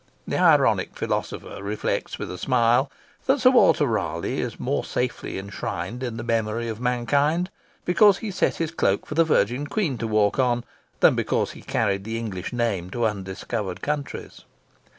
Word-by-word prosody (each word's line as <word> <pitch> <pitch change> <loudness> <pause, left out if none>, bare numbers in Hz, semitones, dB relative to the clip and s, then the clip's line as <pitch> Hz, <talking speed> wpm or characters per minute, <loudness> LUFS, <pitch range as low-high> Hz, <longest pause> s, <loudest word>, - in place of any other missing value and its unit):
The - - -1
ironic - - +4
philosopher - - -3
reflects 105 +2 -2
with - - -5
a 90 - -6
smile 125 +3 +3 0.4
that 270 +2 +3
Sir 255 0 +6
Walter 240 - +5
Raleigh 85 - -1
is - - -5
more - - -1
safely 125 -1 -3
inshrined 100 +2 -5
in 120 -3 -3
the 110 - -4
memory 115 0 -1
of 110 +1 -5
mankind 140 +8 +1 0.3
because 185 +3 +5
he 220 -1 -5
set 180 - +1
his 165 -1 -2
cloak 100 -11 +1
for - - -6
the 165 +2 +5
Virgin 135 -2 +1
Queen 155 - -1
to 115 - -2
walk 105 +1 +2
on 120 -2 +2 0.4
than - - +7
because - - 0
he - - -12
carried 100 -3 0
the 110 +2 -3
English 100 -6 -4
name 115 -7 -1
to 120 +4 -1
undiscovered 95 -1 -3
countries. 145 -1 -4
120 Hz, 170 wpm, -24 LUFS, 105-145 Hz, 0.4 s, than